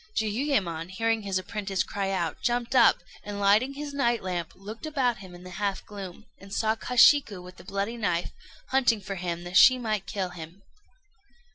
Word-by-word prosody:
Jiuyémon, 210 - -1
hearing 225 +3 0
his 195 -2 -1
apprentice 195 0 -2
cry 195 -1 -3
out, 175 -4 -2
jumped 240 +1 -1
up, 240 -3 +5 0.2
and, 205 0 -6
lighting 215 +7 +3
his 290 0 -6
night 240 -6 +1
lamp, 175 -3 -3
looked 215 +9 -8
about 260 -6 0
him 185 -2 -11
in 175 - -13
the 180 - -10
half 200 -2 -1
gloom, 200 0 -9
and 195 0 -14
saw 220 +2 +1
Kashiku 250 -2 +4
with 180 +1 -12
the - - -13
bloody 200 +4 -3
knife, 175 -6 -1 0.4
hunting 245 -4 +3
for 195 - -5
him 175 -2 -4
that 175 +2 0
she 255 +4 +8
might 215 -5 -2
kill 190 -1 -2
him. 175 +2 -11
200 Hz, 180 wpm, -27 LUFS, 185-235 Hz, 0.4 s, she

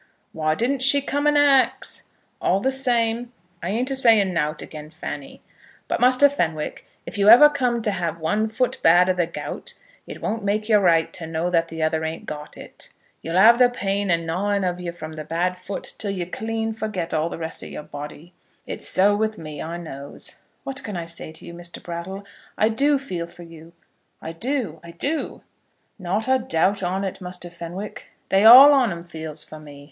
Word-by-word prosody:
"Why 155 -1 0
didn't 255 - 0
she 280 +2 +7
come 285 +1 -1
and 295 0 +4
ax? 280 -2 +3 0.3
All 190 - +2
the 265 +6 0
same, 240 -3 +1 0.3
I 175 - -3
ain't 245 +6 -1
a - - 0
saying 225 -7 +4
nowt 155 -1 -1
again 150 -1 -10
Fanny. 145 -2 -8 0.4
But, - - -1
Muster 255 +3 +5
Fenwick, 160 - -3 0.2
if - - -6
you 200 +1 +5
ever 250 +7 +10
come 250 -5 -1
to 210 - +1
have 170 -4 -3
one 210 +8 0
foot 230 +3 -1
bad 175 +3 +5
o' - - +1
the 175 -2 0
gout, 170 - -7 0.3
it - - -8
won't 220 0 -3
make 210 +1 -1
you 215 -2 +5
right 170 -5 +2
to 165 -3 -7
know 165 +2 -2
that 165 -1 +2
the 160 -1 -4
other 160 0 0
ain't 160 +1 -5
got 150 0 -8
it. - - -8 0.3
Y'll 165 +1 -4
have 230 +5 +7
the 250 -1 +6
pain 200 -4 -2
a 170 - +4
gnawing 190 +5 -1
of 180 -1 -2
you 175 -1 -4
from 160 -2 -9
the 155 0 -6
bad 175 +3 -1
foot 185 +2 -5
till 205 - -1
you 185 -3 -3
clean 225 +4 -3
forget 215 -6 -4
all 160 +1 0
the - - -6
rest 165 0 -4
o' - - -7
your - - -8
body. 150 +4 -9 0.3
It's - - -4
so 200 +2 +4
with 215 +1 -1
me, 155 -3 -8
I 170 +2 -5
knows." 140 -5 -8 0.2
"What 270 +1 -5
can 205 -4 -5
I 170 - -4
say 170 -1 -5
to 160 - -12
you, 170 - -9
Mr. 175 0 -6
Brattle? 180 +4 -7 0.3
I 215 - +3
do 280 +6 +2
feel 180 -12 -5
for 175 +1 -13
you. 165 0 -14 0.5
I 160 - -7
do, 220 - -3
I 170 - -11
do." 280 - -3 0.6
"Not 195 +6 -2
a 260 0 +3
doubt 195 -1 +1
on 190 +2 -1
it, 190 -1 -5
Muster 180 -1 -6
Fenwick. 175 +4 -8 0.2
They 195 +2 +3
all 265 +6 +11
on 255 -6 +3
'em 170 0 -6
feels 160 -3 -6
for 155 - -11
me. 145 -2 -12
185 Hz, 205 wpm, -23 LUFS, 165-225 Hz, 0.6 s, all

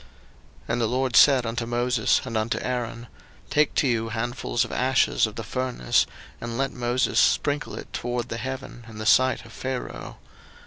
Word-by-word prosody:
02:009:008 - - -23
And 120 +1 0
the 115 - +2
LORD 130 +1 0
said 135 -4 +7
unto 115 +1 -2
Moses 120 -1 +1
and 115 -3 -5
unto 110 +1 0
Aaron, 120 -2 -3 0.5
Take 150 0 +2
to 140 - +3
you 115 -2 0
handfuls 120 +1 -1
of - - -9
ashes 130 -3 +2
of 110 - -9
the 115 - -5
furnace, 125 - 0 0.3
and 115 0 -4
let 135 0 0
Moses 125 +1 +1
sprinkle 145 0 +1
it - - -10
toward 120 0 -3
the 115 - -3
heaven 130 0 -6
in 110 - -11
the 110 - -5
sight 130 +4 +4
of - - -14
Pharaoh. 130 -1 -5
120 Hz, 180 wpm, -25 LUFS, 115-130 Hz, 0.5 s, said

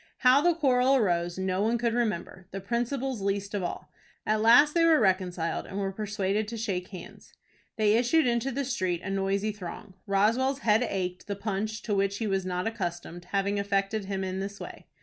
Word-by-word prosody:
How 255 +2 +5
the 345 +1 +3
quarrel 265 -4 +3
arose 175 -7 +1
no 190 0 -1
one 225 +3 +2
could 235 -1 0
remember, 210 -5 -2
the 195 - -6
principals 240 +3 -2
least 200 +1 -2
of 205 - -1
all. 175 - -5 0.3
At 215 0 +1
last 245 +7 +6
they 335 - +3
were 330 -2 +5
reconciled, 185 -5 0
and 190 - -7
were 195 -1 -1
persuaded 205 0 -2
to 230 +1 -5
shake 190 -5 -3
hands. 185 -3 -12 0.4
They 215 -2 +3
issued 245 +7 +3
into 240 +1 +1
the 275 +2 -2
street, 185 -9 -2
a 195 - -4
noisy 195 +2 0
throng. 190 -1 -9
Roswell's 230 +8 +2
head 215 +1 +4
ached, 180 -2 -4
the 200 - -3
punch, 215 +2 -3
to 215 - -2
which 200 0 +1
he 225 - -3
was 195 -2 -1
not 180 0 -2
accustomed, 175 -5 -4
having 200 +2 -1
affected 200 +1 -1
him 195 -1 -3
in 185 0 -3
this 200 +1 -5
way. - - -9
200 Hz, 195 wpm, -28 LUFS, 190-235 Hz, 0.4 s, last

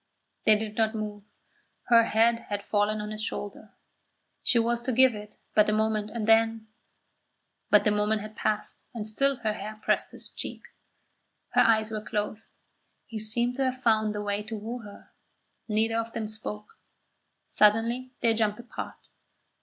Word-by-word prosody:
They 215 -1 +6
did 215 0 -5
not 220 0 +2
move. 210 -1 -5 0.6
Her 230 -1 +7
head 230 +1 +3
had 205 -1 -3
fallen 210 +1 +1
on 210 0 -5
his 215 0 -5
shoulder. 205 -1 -6 0.7
She 245 - +2
was 235 +1 +1
to 255 - -2
give 260 +1 +5
it 210 0 -10 0.2
but 210 0 +5
a - - +2
moment, 215 -1 0
and 225 -1 -3
then 225 0 +3 1.0
But 210 -1 +6
the 210 - +3
moment 210 +1 +1
had 215 0 -9
passed 215 0 -2
and 215 -2 -4
still 275 +6 +1
her 220 -3 -2
hair 215 0 -7
pressed - - +1
his - - -7
cheek. - - -7 0.9
Her - - +4
eyes 220 -1 +3
were 215 -1 -3
closed. 210 +1 -4 0.6
He 225 -2 -6
seemed 235 +4 +1
to 270 - +1
have 255 0 -2
found 215 -2 +2
the 210 - -3
way 205 0 -1
to 215 +1 -6
woo 230 +4 -5
her. 205 -3 -13 0.6
Neither 225 +1 +1
of 230 0 -4
them 220 -1 -3
spoke. 210 -1 -6 0.7
Suddenly 230 +4 +2
they 230 -1 +3
jumped 215 -2 +1
apart. 240 - -8
220 Hz, 170 wpm, -28 LUFS, 210-230 Hz, 1.0 s, Her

